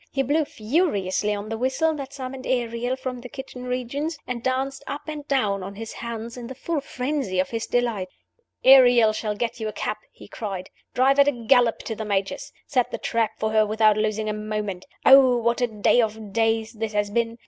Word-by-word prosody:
He 270 - 0
blew 295 +4 +1
furiously 215 - 0
on 205 +1 -6
the 225 0 -4
whistle 265 +6 +1
that 275 -3 -6
summoned 265 -1 -7
Ariel 245 0 -1
from 255 -1 -5
the 250 - -9
kitchen 260 -2 -8
regions, 255 +6 -3
and 245 -2 -4
danced 265 +2 -2
up 290 +1 -5
and 300 -1 -6
down 210 -8 +1
on 195 +2 -7
his 225 +2 -7
hands 235 0 -6
in 240 -1 -7
the 260 - -8
full 305 +3 -2
frenzy 265 -6 -3
of 185 - 0
his 230 -1 -3
delight. 235 -6 0 0.6
"Ariel 245 -4 +7
shall 215 -1 -2
get 235 +2 -3
you 220 - -3
a - - -3
cab!" - - -3
he - - -14
cried. 195 -5 -6 0.2
"Drive 270 +2 +4
at 280 - +7
a 240 -5 -1
gallop 240 -1 +4
to 225 - -4
the 220 - -5
Major's. 200 - -2
Set 255 -4 +1
the - - -4
trap 225 -2 0
for 220 0 -1
her 220 0 +4
without 215 0 +3
losing 215 0 -1
a 215 - -1
moment. 210 -3 -4 0.2
Oh, 265 -2 +8
what 235 +1 0
a 245 - +3
day 220 +2 +3
of 220 -2 -4
days 225 0 +1
this 220 -1 -4
has 205 0 0
been! 230 +1 0
235 Hz, 210 wpm, -24 LUFS, 215-260 Hz, 0.6 s, Oh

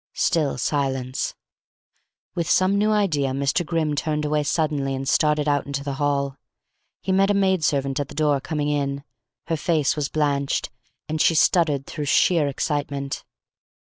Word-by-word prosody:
Still 150 -6 +1
silence. 135 -1 -1 1.0
With 170 -2 -2
some 185 +1 +3
new 210 +1 +2
idea 165 -11 +1
Mr. 140 +6 0
Grimm 160 -2 -1
turned 150 +1 -1
away 150 0 +1
suddenly 145 -2 0
and 135 +1 -5
started 150 +1 +2
out 145 -1 +1
into 140 0 -3
the 140 -1 -3
hall. 140 -1 0 0.7
He 190 - -1
met 195 +1 +3
a 205 - +3
maid 190 -3 +2
servant 135 -2 0
at 145 - -2
the - - -12
door, 145 -3 +2
coming 150 0 -2
in. 140 -1 -1 0.4
Her 165 -1 -1
face 155 -2 +1
was 150 -3 -2
blanched, 140 -2 0 0.4
and 155 0 -1
she 165 - +4
stuttered 150 -4 +3
through 150 -3 -5
sheer 155 +2 +3
excitement. 140 -1 -3
145 Hz, 160 wpm, -23 LUFS, 140-160 Hz, 1.0 s, she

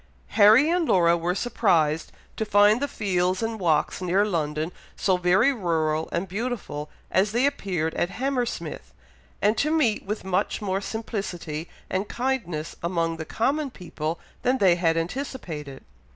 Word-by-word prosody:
Harry 220 +7 +6
and 340 -1 +1
Laura 170 -2 +4
were 175 +2 -1
surprised 170 -10 +1 0.2
to - - -1
find 210 +2 +4
the 285 - +1
fields 185 -4 0
and 225 -1 -2
walks 165 -1 +1
near 185 +3 +2
London 155 -4 -1 0.2
so 190 - +2
very 185 +9 +3
rural 160 -7 0
and 175 +3 -2
beautiful 195 -8 -4 0.2
as 200 +3 +2
they 245 +3 +3
appeared 185 - -1
at 175 - 0
Hammersmith, 195 - -3 0.5
and 210 +2 +4
to 305 - +2
meet 300 -9 +2
with 210 +2 -4
much 190 +1 0
more 195 -2 -1
simplicity 185 -8 -4 0.2
and 190 +2 -2
kindness 210 -12 -2
among 165 -1 -1
the 160 - -5
common 275 - 0
people 165 -6 -5 0.2
than 255 +1 +2
they 190 -6 +5
had 165 -2 +1
anticipated. 165 - -5
190 Hz, 150 wpm, -25 LUFS, 165-225 Hz, 0.5 s, Harry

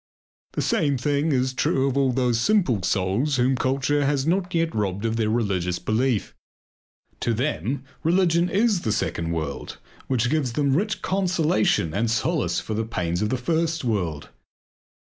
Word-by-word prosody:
The - - -1
same 140 -2 +1
thing 145 +4 0
is 130 -1 +1
true 130 +1 +1
of 135 - -1
all 135 -2 +2
those 125 -2 +1
simple 170 - +2
souls 100 - 0
whom 130 +1 +2
culture 135 +3 +1
has 140 -1 +1
not 180 +2 0 0.2
robbed 100 -1 -2
of 115 0 0
their 110 -2 0
religious 95 -6 0
belief. 110 +3 0 0.9
To 115 - 0
them 135 +1 -2 0.2
religion 170 0 +2
is 205 -2 +2
the 110 - -1
second 85 -6 -2
world 80 -4 -4 0.3
which 125 -1 +1
gives 145 -6 0
them 140 0 +1
rich 210 +6 -1
consolation 165 - +1
and 115 +3 0
solace 150 +5 0
for 110 - -5
the 110 +1 -1
pains 90 -6 -2
of 105 - 0
the 130 - 0
first 165 +5 -1
world. 90 - -2
130 Hz, 160 wpm, -24 LUFS, 110-150 Hz, 0.9 s, all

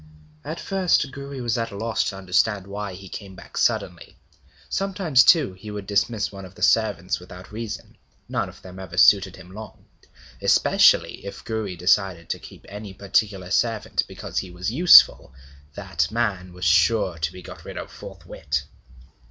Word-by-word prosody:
At 160 - -6
first 185 -8 +1
Gouri 140 -1 -7
was 120 -1 -1
at 115 0 -2
a 100 - -9
loss 110 +1 0
to 95 - -3
understand 95 +1 +1
why 100 -1 -6
he 95 +1 -11
came 95 0 -9
back - - -14
suddenly. - - -1 0.5
Sometimes, 190 -9 +2
too, 150 - +5
he 95 +3 -11
would 105 -1 -6
dismiss 105 +2 0
one 100 -1 -9
of 95 0 -12
the - - -6
servants - - +2
without 90 +2 -12
reason; 110 0 -7 0.3
none - - -2
of - - -16
them 95 0 -11
ever 90 -2 -9
suited 95 -2 +5
him 90 - -14
long. 110 +2 -11 0.6
Especially - - +4
if 100 - -9
Gouri 110 -4 -3
desired 90 -1 +1
to - - -3
keep - - -14
any 105 -1 -9
particular 100 -1 -1
servant 115 0 +1
because - - -4
he 95 - -6
was 90 +3 -4
useful, 150 - +6 0.4
that 90 -6 -2
man 100 -6 -2
was 90 0 -6
sure 85 +1 +3
to 80 0 -1
be 90 0 -11
got - - -11
rid - - -9
of - - -7
forthwith. 70 -2 -5
100 Hz, 170 wpm, -23 LUFS, 90-115 Hz, 0.6 s, useful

